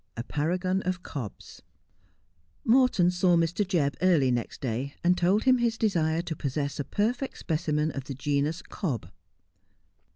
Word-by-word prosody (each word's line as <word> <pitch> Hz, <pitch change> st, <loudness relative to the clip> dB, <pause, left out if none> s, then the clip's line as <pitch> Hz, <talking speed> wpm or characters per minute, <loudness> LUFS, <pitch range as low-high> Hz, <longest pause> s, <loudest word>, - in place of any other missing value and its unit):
A 115 Hz, -, -3 dB
PARAGON 180 Hz, +7 st, -1 dB
OF 180 Hz, 0 st, -3 dB
COB& 125 Hz, -9 st, -5 dB, 1.3 s
Morton 230 Hz, -7 st, +4 dB
saw 180 Hz, 0 st, +3 dB
Mr. 170 Hz, +4 st, +1 dB
Jebb 165 Hz, -8 st, +1 dB
early 165 Hz, -8 st, +4 dB
next 120 Hz, -2 st, -2 dB
day, 130 Hz, +1 st, -3 dB
and 180 Hz, +1 st, +4 dB
told 185 Hz, +5 st, +2 dB
him 255 Hz, -1 st, +4 dB
his 235 Hz, -1 st, +1 dB
desire 165 Hz, -7 st, +1 dB
to 165 Hz, -2 st, -4 dB
possess 140 Hz, +1 st, -3 dB
a -, -, 0 dB
perfect 240 Hz, -, -1 dB
specimen 155 Hz, -1 st, -1 dB
of 135 Hz, -2 st, -6 dB
the 135 Hz, -, -6 dB
genus 145 Hz, +5 st, -1 dB
cob. 125 Hz, -, -4 dB
165 Hz, 150 wpm, -27 LUFS, 140-185 Hz, 1.3 s, Morton